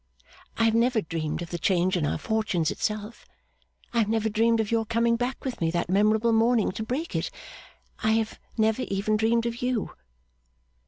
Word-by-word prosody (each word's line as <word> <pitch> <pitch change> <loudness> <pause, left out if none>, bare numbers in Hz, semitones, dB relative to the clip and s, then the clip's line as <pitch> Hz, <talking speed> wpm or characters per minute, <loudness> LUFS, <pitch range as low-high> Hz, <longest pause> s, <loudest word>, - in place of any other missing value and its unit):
I 225 - +2
have 225 -1 +4
never 235 +1 +3
dreamed 160 -3 -3
of 170 - -10
the 175 - -3
change 185 +1 +2
in 160 -5 0
our - - -1
fortunes 215 -8 0
itself; 215 +1 -4 0.7
I 235 - +2
have 215 -2 +2
never 220 0 +1
dreamed 225 +2 +2
of 220 -1 -1
your 230 -1 +2
coming 230 +1 +1
back 245 +4 -3
with 255 -7 -4
me 165 - +2
that 170 +1 -1
memorable 215 +3 +3
morning 225 -1 +3
to 220 - -5
break 270 +9 -3
it; - - -1 0.7
I 220 0 +2
have 220 -1 -1 0.2
never 220 +2 +2
even 200 0 0
dreamed 225 +2 +2
of 235 0 -3
you. 250 -4 -1
220 Hz, 190 wpm, -26 LUFS, 200-230 Hz, 0.7 s, have